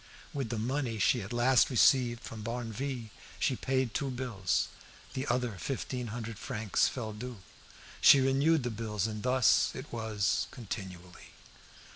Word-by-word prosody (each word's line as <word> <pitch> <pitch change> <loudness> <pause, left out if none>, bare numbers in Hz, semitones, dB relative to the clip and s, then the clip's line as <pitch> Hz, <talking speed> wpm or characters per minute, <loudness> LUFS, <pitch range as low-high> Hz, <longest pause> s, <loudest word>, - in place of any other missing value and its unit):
With 135 -5 -3
the 115 - -2
money 120 +1 -1
she 115 +4 +3
at 95 +3 -7
last 120 +1 +4
received 125 -1 +4
from 110 - -7
Barneville 120 +1 -4 0.3
she 130 - +1
paid 130 -3 -1
two 140 - -1
bills; 120 -8 -1 0.5
the 130 +2 -3
other 120 -5 -1
fifteen 125 0 -3
hundred 115 -1 -6
francs 110 -6 0
fell 110 -4 -4
due. 120 +2 -7 0.6
She 140 - +9
renewed 135 +3 +3
the 120 - -2
bills, 105 -3 -2
and 110 -1 -4
thus 125 +1 +4
it 130 0 -8
was 110 -3 0
continually. 95 -6 -8
120 Hz, 145 wpm, -31 LUFS, 110-130 Hz, 0.6 s, She